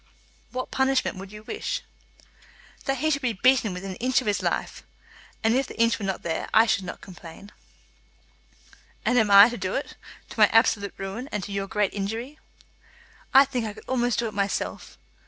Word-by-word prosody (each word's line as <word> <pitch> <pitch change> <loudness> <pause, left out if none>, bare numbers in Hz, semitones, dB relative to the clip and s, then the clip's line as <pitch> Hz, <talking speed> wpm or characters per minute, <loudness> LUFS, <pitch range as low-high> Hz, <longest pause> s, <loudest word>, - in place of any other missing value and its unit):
"What 255 0 -5
punishment 265 -5 +1
would 190 +1 -9
you 210 0 -11
wish?" 440 - -4 1.0
"That 270 0 0
he 310 +4 0
should 280 -1 0
be 245 -3 0
beaten 245 +1 +3
within 185 +2 -6
an 185 - -8
inch 255 +1 +2
of 255 - -6
his 205 -1 0
life; - - -2 0.6
and 225 +1 +3
if 265 +1 +1
the - - -11
inch 230 0 +3
were 205 - -4
not 190 -1 -3
there, 165 -1 -3
I 220 +1 +7
should 200 -4 0
not - - -7
complain." 185 +1 -12 1.5
"And 245 0 +3
I 200 0 +11
am 220 - +5
to 240 - -5
do 185 -2 -3
it, 275 - -3 0.4
to - - -8
my 210 - +8
absolute 220 -3 +2
ruin, 195 +8 -6
and 210 -2 -3
to 200 - -7
your 195 0 -2
great 210 -1 0
injury?" 225 +9 -4 0.9
"I 270 +1 +8
think 250 -4 -3
I 210 - -5
could - - -14
almost 245 -3 0
do 235 - 0
it 215 - -7
myself." 200 0 -3
225 Hz, 195 wpm, -25 LUFS, 200-255 Hz, 1.5 s, I